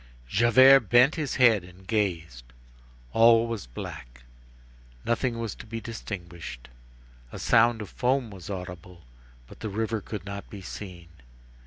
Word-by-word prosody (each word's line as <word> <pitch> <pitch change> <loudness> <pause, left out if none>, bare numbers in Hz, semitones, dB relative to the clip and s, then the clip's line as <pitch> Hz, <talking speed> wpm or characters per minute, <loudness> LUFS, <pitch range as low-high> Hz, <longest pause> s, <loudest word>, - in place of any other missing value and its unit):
Javert 120 - +6
bent 125 +4 +6
his 150 -4 -3
head 115 -7 +5
and 90 +1 -16
gazed. 85 - -2 0.7
All 115 0 +6
was 115 - -5
black. - - -9 0.8
Nothing 120 0 0
was 115 -2 -4
to - - -12
be 115 +1 -5
distinguished. 90 - -8 0.6
A - - -8
sound 115 -1 +3
of 100 - -10
foam 125 -2 0
was 95 -3 -10
audible; 90 -2 -8 0.4
but - - -15
the 110 - -4
river 110 +1 -2
could 100 -2 -7
not 100 0 -7
be 100 - -9
seen. 90 -3 -9
105 Hz, 140 wpm, -26 LUFS, 90-115 Hz, 0.8 s, Javert